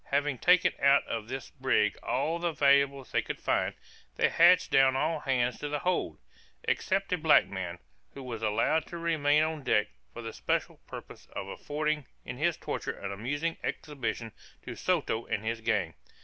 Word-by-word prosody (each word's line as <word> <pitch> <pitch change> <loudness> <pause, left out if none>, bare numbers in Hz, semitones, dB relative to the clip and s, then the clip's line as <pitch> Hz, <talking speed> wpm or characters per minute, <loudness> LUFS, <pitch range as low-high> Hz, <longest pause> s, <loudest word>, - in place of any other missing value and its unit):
Having 140 -2 0
taken 180 0 +4
out 140 0 +5
of 110 -2 -4
this 130 +1 -6
brig 130 -7 +1
all 155 +6 -1
the 170 0 0
valuables 140 -2 +3
they - - +2
could - - -6
find, - - 0 0.4
they - - +3
hatched 175 +2 +5
down 135 -1 +5
all 155 +3 0
hands 125 -3 0
to 150 - -4
the 150 - -1
hold, 180 +5 -1 0.5
except 195 0 0
a 180 - 0
black 155 0 +5
man, 90 -2 -5 0.4
who 135 - -8
was 120 -3 -6
allowed 115 +9 +1
to 170 - -7
remain 155 -3 +2
on 155 -1 -2
deck 105 -5 +2 0.2
for 120 - -8
the 115 - -6
special - - -1
purpose - - -10
of - - -4
affording 150 -2 -2 0.2
in - - -6
his 170 +1 +1
torture - - -4
an 100 - -5
amusing 145 +11 -2
exhibition 120 -6 -4 0.3
to - - -7
Soto 115 +1 -1
and 110 0 -2
his 115 0 -2
gang. 105 -7 0
140 Hz, 175 wpm, -29 LUFS, 115-155 Hz, 0.5 s, out